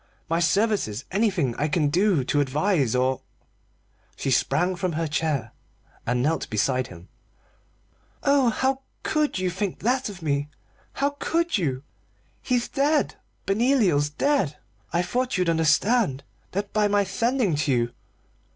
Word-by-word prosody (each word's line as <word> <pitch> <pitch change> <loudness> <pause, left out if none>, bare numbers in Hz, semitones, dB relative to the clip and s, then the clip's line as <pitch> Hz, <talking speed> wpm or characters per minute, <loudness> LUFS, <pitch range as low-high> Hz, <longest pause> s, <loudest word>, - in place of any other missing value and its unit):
My 165 +1 +1
services 175 - +1
anything 190 - +1
I 150 - +1
can 150 -1 +1
do 180 -2 +2
to 145 +3 +1
advise 145 - +1
or 130 +1 +1 0.5
" - - -38
She 135 - -2
sprang 165 +9 +2
from 180 -1 -2
her 165 +1 -1
chair 145 -6 -1 0.6
and 125 +1 +1
knelt 160 +3 0
beside 130 +4 0
him. 85 0 -13 1.2
"Oh, 280 -3 +4
how 265 +3 0 0.2
could 305 -5 0
you 185 -1 0
think 190 +1 -3
that 250 +2 +1
of 185 -5 -10
me? 145 -1 0 0.4
How 280 +1 0
could 335 +1 0
you? 135 -6 -2 0.6
He's 245 -2 0
dead 290 +2 +1 0.3
Benoliel's 195 - +2
dead. 190 - 0 0.3
I 175 - +1
thought 250 +7 -1
you'd 180 -2 +2
understand 160 - +2 0.3
that 200 +1 -3
by 210 -1 +3
my 205 0 +3
sending 230 +1 0
to 145 -1 0
you. 120 -1 +1
180 Hz, 140 wpm, -25 LUFS, 145-225 Hz, 1.2 s, Oh